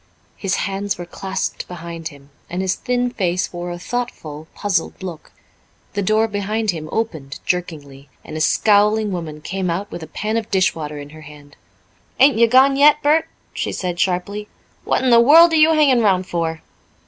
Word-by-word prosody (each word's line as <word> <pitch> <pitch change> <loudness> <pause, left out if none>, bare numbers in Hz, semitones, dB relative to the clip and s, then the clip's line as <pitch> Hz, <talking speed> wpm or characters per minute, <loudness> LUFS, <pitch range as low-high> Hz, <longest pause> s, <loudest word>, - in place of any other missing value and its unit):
His 195 -2 -1
hands 200 +1 -2
were 175 - -6
clasped 190 +2 -4
behind 170 -2 -7
him, 140 -2 -14 0.2
and 180 +2 -3
his 185 -1 +1
thin 245 0 -1
face 185 -5 -1
wore 175 0 -5
a 175 - -5
thoughtful, 175 -8 -5
puzzled 195 -1 -2
look. 175 -4 -8 0.6
The 205 - -1
door 215 +3 +2
behind 210 +1 -1
him 155 -3 -7
opened 160 -12 -3
jerkingly, 145 -6 -4 0.2
and 155 - -8
a 155 - -3
scowling 210 +5 +3
woman 160 -4 -5
came 190 +3 -3
out 190 +5 -3
with 175 - -7
a 160 - -8
pan 215 +7 -3
of 225 -1 -4
dishwater 165 -7 0
in 145 0 -9
her 155 0 -12
hand. 145 -1 -14 0.6
"Ain't 270 -1 +5
you 235 - +6
gone 265 +3 +5
yet, 295 +1 +5
Bert?" 305 +2 +3 0.3
she - - -3
said 180 -2 -4
sharply. 200 +3 -1 0.4
"What - - +1
in 255 - +3
the 235 0 +7
world 325 +7 +7
are - - +4
you 310 +1 +6
hanging 275 -6 +4
round 190 -4 +2
for?" 165 -2 -3
190 Hz, 185 wpm, -20 LUFS, 165-225 Hz, 0.6 s, the